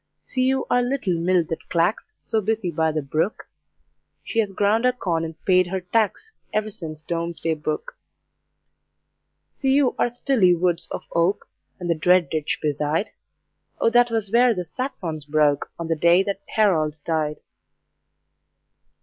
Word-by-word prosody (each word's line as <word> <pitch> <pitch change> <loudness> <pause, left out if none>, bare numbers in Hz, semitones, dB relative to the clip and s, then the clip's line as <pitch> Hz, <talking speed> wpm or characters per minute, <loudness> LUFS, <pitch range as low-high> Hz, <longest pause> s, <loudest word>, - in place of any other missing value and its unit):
See 255 -1 -1
you 265 0 +1
our 245 - +3
little 245 -6 -1
mill 175 +1 +2
that 165 - -5
clacks, 170 +5 0
So 220 -1 0
busy 215 -3 -1
by 160 0 +1
the 155 -1 -2
brook? 155 +9 -2 0.8
She 225 - -2
has 210 -3 +1
ground 205 +4 +2
her 250 - +4
corn 175 -9 -2
and 160 -1 -6
paid 185 -1 +4
her 190 +2 -2
tax 220 - -1 0.2
Ever 215 0 -1
since 155 -6 -7
Domesday 170 -1 -2
Book. 155 - -4 1.6
See 265 -1 0
you 275 -2 +3
our - - +3
stilly 235 -7 +3
woods 175 0 0
of - - -5
oak, 170 +4 +1 0.3
And 175 - -4
the 170 - +3
dread 175 +2 +3
ditch 155 -2 -1
beside? 150 +5 0 0.7
O 230 - +3
that 245 0 +5
was 220 -3 -2
where 240 0 +4
the 180 -1 -3
Saxons 170 - -5
broke, 150 -1 +1
On 170 - -5
the 165 - +1
day 170 +4 +4
that 200 0 -3
Harold 160 -8 +2
died. 155 -2 -1
180 Hz, 160 wpm, -23 LUFS, 160-225 Hz, 1.6 s, that